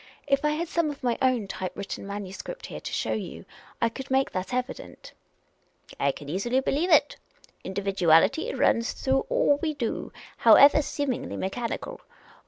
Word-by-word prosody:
If 275 0 +1
I 300 - +3
had 315 +3 -2
some 335 -1 0
of 285 -2 -8
my 240 -2 +1
own 255 -6 +2
type 185 -1 -5
written 200 0 -6
manuscript 200 - -7
here - - -7
to - - -7
show - - -1
you, - - -6 0.3
I 230 - +2
could 265 +3 -8
soon 265 - +2
make 270 - 0
that 185 +4 -4
evident." 250 +1 -5 0.4
" - - -22
I 140 - +2
can 145 - -11
easily 200 - 0
believe 290 +6 0
it. 295 -3 +4 0.5
Individuality 195 - +2
runs 230 +1 +2
through 265 0 0
all 285 - +3
we 310 -2 -1
do, 240 -5 -3 0.3
however 285 +2 +7
seemingly 285 -3 -3
mechanical. 240 - -4
255 Hz, 170 wpm, -26 LUFS, 200-290 Hz, 0.5 s, however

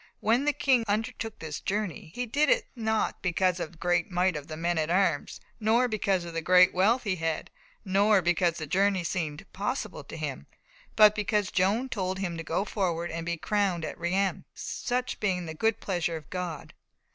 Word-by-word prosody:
"When 235 +6 +2
the 295 - +4
King 260 -5 +3
undertook 220 +1 -2
this 155 -2 -6
journey, 200 -6 -3
he 250 - -2
did 285 +6 +2
it - - +3
not 220 -2 -1
because 180 0 +1
of 170 - -5
the - - -18
great 175 +4 +1
might 180 -1 +1
of 150 -2 -6
the 155 - -6
men 170 0 0
at 155 0 -1
arms, 175 -5 +1 0.2
nor 230 +3 +3
because 195 -5 0
of 170 - -7
the 165 - -2
great 180 +2 +6
wealth 215 +7 +3
he 195 -4 -1
had, 165 -1 -2 0.3
nor 200 +2 +4
because 175 0 +2
the 155 - -4
journey 190 +3 +2
seemed 165 0 -3
possible 205 +7 -3
to - - -8
him, - - -5 0.5
but 210 -1 +8
because 210 -1 0
Joan 200 +8 +2
told 190 -6 -2
him 185 -3 -3
to 165 - -5
go 170 +5 -1
forward 175 -4 -1
and 165 +1 -5
be 170 0 -1
crowned 195 -3 0
at - - -5
Reims, 190 +3 0
such 250 0 -3
being 185 -4 0
the 160 - -5
good 220 +7 +1
pleasure 175 -3 -1
of 150 - -13
God." 180 -5 -5
185 Hz, 195 wpm, -28 LUFS, 170-215 Hz, 0.5 s, but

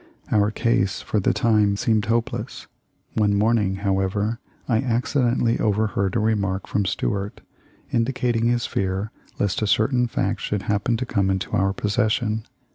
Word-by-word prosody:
Our 105 -1 +3
case 105 -3 0
for 105 - 0
the 95 - +2
time 105 -3 +2
seemed 110 0 +1
hopeless. 115 0 -2 0.5
One 105 -2 +2
morn 110 +3 +3
ing, 95 -2 0
however, 100 +4 0 0.3
I 115 - +2
accidentally 120 -1 +1
overheard 100 -2 0
a - - +3
remark 100 -3 0
from 100 -1 -1
Stuart 100 +2 -2 0.5
indicating 120 -1 0
his 120 -1 +1
fear 95 +2 -2 0.3
lest 100 0 0
a 105 - +1
certain 125 +4 +2
fact - - -1
should 105 -2 -2
happen 105 +3 0
to 125 - -3
come 100 -5 0
into 95 -1 -2
our 95 +1 +2
possession. 110 +2 0
105 Hz, 150 wpm, -23 LUFS, 100-115 Hz, 0.5 s, Our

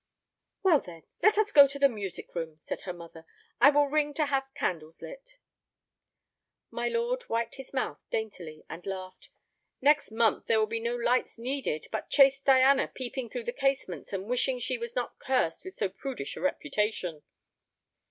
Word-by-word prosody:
"Well, 350 -6 +6
then, 170 -7 -12 0.2
let 425 0 +5
us 425 -1 +2
go 285 -5 +9
to 275 +1 -6
the 280 0 +6
music 205 -8 -6
room," 165 -3 -4
said - - -6
her 185 - -5
mother. 170 -2 -11 0.4
"I 260 +4 +8
will 290 0 +4
ring 295 0 0
to 310 - +2
have 270 -1 -1
candles 160 -2 -3
lit." - - -10 1.3
My - - -2
lord 480 +1 -1
wiped 230 +2 -1
his 270 -1 -10
mouth 265 - -3
daintily 180 -8 -5
and 175 - -8
laughed. 185 -1 -7 0.5
"Next 295 +2 +3
month 225 0 +1
there 225 - +4
will 215 - +3
be 225 +1 -3
no 235 +1 -2
lights 245 +1 0
needed, 245 - -2
but - - -4
chaste 275 -1 +5
Diana 270 0 +5
peeping 255 -1 -5
through - - -5
the 480 +1 -3
casements 270 - -1
and 195 -1 -3
wishing 250 +3 +1
she 245 0 -2
was 235 0 -6
not 245 - -3
cursed 250 -11 0
with 375 - -9
so 200 - 0
prudish 195 - -6
a - - -8
reputation." 210 - -1
250 Hz, 175 wpm, -29 LUFS, 195-280 Hz, 1.3 s, go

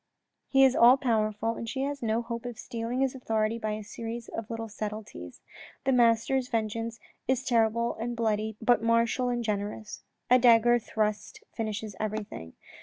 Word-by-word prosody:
He 270 -1 +5
is 265 -1 +5
all 245 +3 +7
powerful 225 -4 0
and 230 - -5
she 265 - -3
has 280 0 -3
no 225 0 0
hope 235 0 -5
of 240 -2 -7
stealing 235 +2 -3
his 270 -1 +1
authority 225 -3 -1
by 215 -1 -2
a 215 0 -5
series 230 +2 -6
of 225 -1 -6
little 225 -1 -4
subtleties. 210 - -7 0.4
The 270 - +2
master's 245 +1 +3
vengeance 230 0 -2 0.3
is 260 0 +1
terrible 235 -1 +2
and 240 +1 -3
bloody 220 -1 0
but 240 +1 +3
martial 230 +2 +2
and 240 -1 -1
generous; 210 0 -4 0.3
a 250 +1 +6
dagger 240 0 +5
thrust 215 -2 -3
finishes 215 -2 -4
everything. 210 - -5
230 Hz, 165 wpm, -28 LUFS, 215-240 Hz, 0.4 s, all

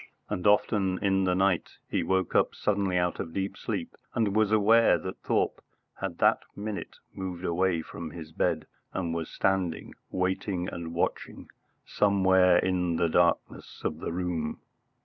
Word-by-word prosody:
and 90 - -1
often 100 -2 +3
in 95 -1 +2
the 90 -1 +2
night 95 -2 +1
he - - 0
woke 95 +2 0
up - - +2
suddenly 100 -3 0
out 90 0 0
of 80 - -5
deep 95 0 -2
sleep - - -4 0.2
and 105 -4 +1
was 110 -1 +3
aware 110 +2 +5
that 95 - -7
Thorpe - - 0 0.4
had - - -4
that - - +4 0.2
minute 105 0 -5 0.2
moved 95 -1 -5
away 85 -1 +1
from 85 0 -7
his 80 -1 -9
bed - - 0 0.3
and 85 -3 -2
was 80 -1 -3
standing 90 -4 -1 0.2
waiting 90 0 -1
and 85 -1 -6
watching 85 - -3 0.3
somewhere 95 -3 +4
in 90 -2 +1
the 85 0 +1
darkness 85 +1 0
of 75 - -2
the - - -4
room. 85 -3 -2
95 Hz, 155 wpm, -28 LUFS, 85-95 Hz, 0.4 s, aware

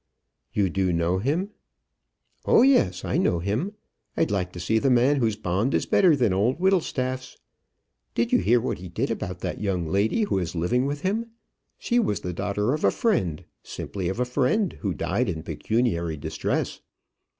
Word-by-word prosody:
"You 100 -2 +1
do 95 -2 +1
know 85 +2 +1
him?" 160 - -1 0.9
"Oh - - +6
yes, 95 - +3
I - - 0
know 85 - +2
him. 110 - -2 0.4
I'd - - +1
like 90 -3 -1
to 90 - -7
see 110 +6 +1
the 135 - +2
man 130 +3 +4
whose 115 -5 +1
bond 105 +5 0
is - - +1
better 175 -5 +4
than 120 -8 +2
old 110 +9 +1
Whittlestaff's. 130 -9 0 0.8
Did 115 0 0
you - - +6
hear 110 +6 +3
what 115 - -3
he 90 0 -8
did 115 +10 -2
about 90 -5 -4
that 90 - -4
young 95 -5 -1
lady 100 - +1
who 200 - 0
is 85 -1 -4
living 120 +11 +1
with 145 0 -3
him? 210 +5 -1 0.5
She 240 0 +1
was 105 - 0
the 90 - -4
daughter 100 +6 -1
of 155 - -3
a 100 - +6
friend, 95 - 0 0.2
simply 95 -3 -5
of 95 - -4
a 125 - +2
friend 140 - +1
who 100 -6 -1
died - - -1
in 80 -1 -4
pecuniary 85 0 -1
distress. - - -2
110 Hz, 185 wpm, -25 LUFS, 90-135 Hz, 0.9 s, Oh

